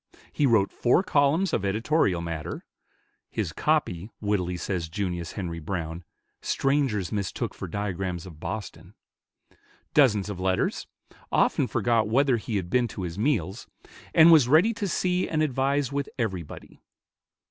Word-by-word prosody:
He 145 Hz, -, +2 dB
wrote 110 Hz, -5 st, +3 dB
four 125 Hz, +9 st, +2 dB
columns 160 Hz, +1 st, +2 dB
of 100 Hz, -, 0 dB
editorial 100 Hz, -, +1 dB
matter 85 Hz, -1 st, -5 dB, 0.6 s
(his -, -, -3 dB
copy, 90 Hz, +4 st, 0 dB
wittily 95 Hz, -4 st, -1 dB
says 85 Hz, -3 st, -3 dB
Junius 90 Hz, -2 st, -3 dB
Henri 85 Hz, -5 st, -4 dB
Browne, 85 Hz, 0 st, -4 dB, 0.4 s
"strangers 135 Hz, -9 st, 0 dB
mistook 100 Hz, +2 st, -3 dB
for 95 Hz, -, -7 dB
diagrams 95 Hz, -1 st, -3 dB
of 80 Hz, -4 st, -12 dB
Boston"), 95 Hz, -1 st, -7 dB, 1.0 s
dozens 110 Hz, -9 st, +4 dB
of 100 Hz, -3 st, -5 dB
letters, 95 Hz, 0 st, 0 dB, 0.4 s
often -, -, +2 dB
forgot 115 Hz, -3 st, +1 dB
whether 130 Hz, +1 st, +3 dB
he 110 Hz, 0 st, -4 dB
had 90 Hz, -3 st, -3 dB
been 125 Hz, -1 st, +3 dB
to 100 Hz, -3 st, -7 dB
his 85 Hz, +2 st, -5 dB
meals, 110 Hz, -5 st, -1 dB, 0.4 s
and 165 Hz, +1 st, +7 dB
was 150 Hz, -7 st, +7 dB
ready 165 Hz, -, +5 dB
to 205 Hz, -2 st, -3 dB
see 180 Hz, 0 st, 0 dB
and 155 Hz, -1 st, +1 dB
advise 140 Hz, 0 st, 0 dB
with 140 Hz, 0 st, -2 dB
everybody. 95 Hz, -, -5 dB
105 Hz, 140 wpm, -26 LUFS, 90-140 Hz, 1.0 s, and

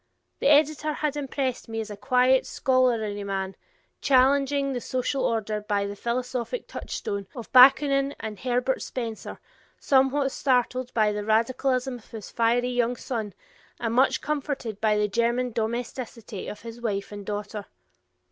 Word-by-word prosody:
The -, -, +1 dB
editor 305 Hz, +1 st, +4 dB
had 300 Hz, -1 st, -2 dB
impressed 270 Hz, -4 st, -3 dB
me 225 Hz, 0 st, -3 dB
as 220 Hz, -1 st, -5 dB
a -, -, -5 dB
quiet, 255 Hz, +4 st, +3 dB
scholarly 230 Hz, -6 st, +1 dB
man, 195 Hz, -1 st, -3 dB, 0.5 s
challenging 275 Hz, +1 st, +3 dB
the 245 Hz, -, -3 dB
social 255 Hz, +3 st, -1 dB
order 215 Hz, -2 st, -1 dB
by 205 Hz, -1 st, 0 dB
the 200 Hz, 0 st, -5 dB
philosophic 250 Hz, -, -3 dB
touchstone 200 Hz, -1 st, -5 dB
of 235 Hz, -3 st, -8 dB
Bakunin 275 Hz, +2 st, +6 dB
and 215 Hz, -3 st, -6 dB
of -, -, -15 dB
Herbert 250 Hz, +1 st, 0 dB
Spencer, 230 Hz, -4 st, -5 dB, 0.4 s
somewhat 270 Hz, 0 st, +3 dB
startled 255 Hz, -1 st, 0 dB
by 215 Hz, -2 st, +3 dB
the 210 Hz, 0 st, -3 dB
radicalism 250 Hz, +3 st, +1 dB
of 225 Hz, -, -22 dB
his 220 Hz, -3 st, -9 dB
fiery 240 Hz, +2 st, +2 dB
young 245 Hz, 0 st, +1 dB
son 220 Hz, -5 st, -4 dB, 0.4 s
and 230 Hz, -1 st, -1 dB
much 260 Hz, +3 st, +3 dB
comforted 280 Hz, -7 st, -3 dB
by 215 Hz, -1 st, +3 dB
the 210 Hz, 0 st, +2 dB
German 235 Hz, +4 st, 0 dB
domesticity 230 Hz, -2 st, -4 dB
of 210 Hz, -, -7 dB
his 230 Hz, 0 st, -9 dB
wife 200 Hz, -4 st, -2 dB
and 205 Hz, -1 st, -7 dB
daughter. 205 Hz, 0 st, -5 dB
245 Hz, 150 wpm, -26 LUFS, 215-265 Hz, 0.5 s, Bakunin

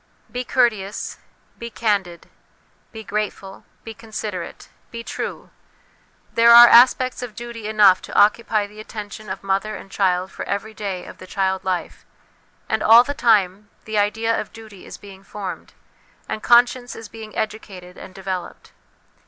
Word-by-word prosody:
Be 250 Hz, 0 st, -3 dB
courteous, 220 Hz, -6 st, -1 dB, 0.4 s
be 235 Hz, -, -6 dB
candid, 200 Hz, -7 st, -2 dB, 0.6 s
be 220 Hz, -1 st, -9 dB
grateful, 205 Hz, -2 st, -5 dB, 0.2 s
be 225 Hz, -, -8 dB
considerate, 210 Hz, -5 st, -7 dB, 0.2 s
be 230 Hz, -1 st, -8 dB
true; -, -, -6 dB, 0.8 s
there 235 Hz, 0 st, +7 dB
are 240 Hz, 0 st, +11 dB
aspects 255 Hz, +2 st, +5 dB
of 240 Hz, -4 st, -7 dB
duty 235 Hz, -2 st, -7 dB
enough 210 Hz, -4 st, +5 dB
to -, -, -2 dB
occupy 215 Hz, 0 st, +3 dB
the 210 Hz, +1 st, -14 dB
attention 215 Hz, -1 st, -9 dB
of 190 Hz, +1 st, -6 dB
mother 195 Hz, +2 st, -1 dB
and 195 Hz, -, -11 dB
child 185 Hz, -1 st, 0 dB
for -, -, -7 dB
every 210 Hz, +2 st, -4 dB
day 195 Hz, -4 st, -5 dB
of -, -, -12 dB
the 185 Hz, -, -11 dB
child 190 Hz, 0 st, -1 dB
life; 185 Hz, -2 st, -4 dB, 0.6 s
and -, -, -1 dB
all 230 Hz, +2 st, +7 dB
the 285 Hz, -, -4 dB
time, 210 Hz, -7 st, +1 dB, 0.2 s
the 215 Hz, -1 st, -1 dB
idea 220 Hz, +3 st, 0 dB
of -, -, -10 dB
duty 215 Hz, -4 st, -13 dB
is -, -, -9 dB
being 195 Hz, -2 st, -14 dB
formed, 195 Hz, -1 st, -8 dB, 0.5 s
and 215 Hz, -, -4 dB
conscience 245 Hz, +1 st, +3 dB
is 225 Hz, -, -9 dB
being 220 Hz, 0 st, -11 dB
educated 195 Hz, -4 st, -6 dB
and 185 Hz, -, -12 dB
developed. 190 Hz, -2 st, -6 dB
210 Hz, 155 wpm, -21 LUFS, 195-230 Hz, 0.8 s, are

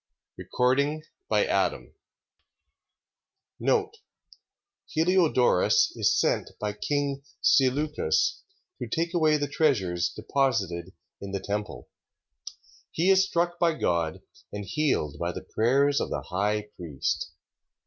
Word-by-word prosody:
2 -, -, -8 dB
Machabees 140 Hz, +5 st, +2 dB, 0.3 s
Chapter 485 Hz, -, +2 dB, 1.8 s
3 435 Hz, -3 st, +1 dB, 1.0 s
Heliodorus 170 Hz, -, +3 dB
is -, -, +2 dB
sent -, -, 0 dB
by 105 Hz, -1 st, -2 dB
king 140 Hz, +5 st, -2 dB, 0.2 s
Seleucus 150 Hz, -, +2 dB, 0.4 s
to -, -, -4 dB
take 170 Hz, +1 st, -2 dB
away 155 Hz, -3 st, +3 dB
the 145 Hz, -1 st, -2 dB
treasures 100 Hz, -, +1 dB
deposited 105 Hz, -8 st, -1 dB, 0.3 s
in 100 Hz, 0 st, -7 dB
the 100 Hz, -, -1 dB
temple. 105 Hz, +2 st, -5 dB, 1.0 s
He 180 Hz, +4 st, +2 dB
is 190 Hz, 0 st, +4 dB
struck 175 Hz, -1 st, -1 dB
by 165 Hz, -2 st, +2 dB
God, 85 Hz, -, -1 dB, 0.3 s
and 105 Hz, -1 st, -6 dB
healed 95 Hz, -, -1 dB
by 85 Hz, +1 st, -1 dB
the -, -, -8 dB
prayers 140 Hz, +5 st, +2 dB
of -, -, -2 dB
the -, -, -3 dB
high 105 Hz, +3 st, -1 dB
priest. 80 Hz, -7 st, -3 dB
135 Hz, 110 wpm, -27 LUFS, 100-160 Hz, 1.8 s, is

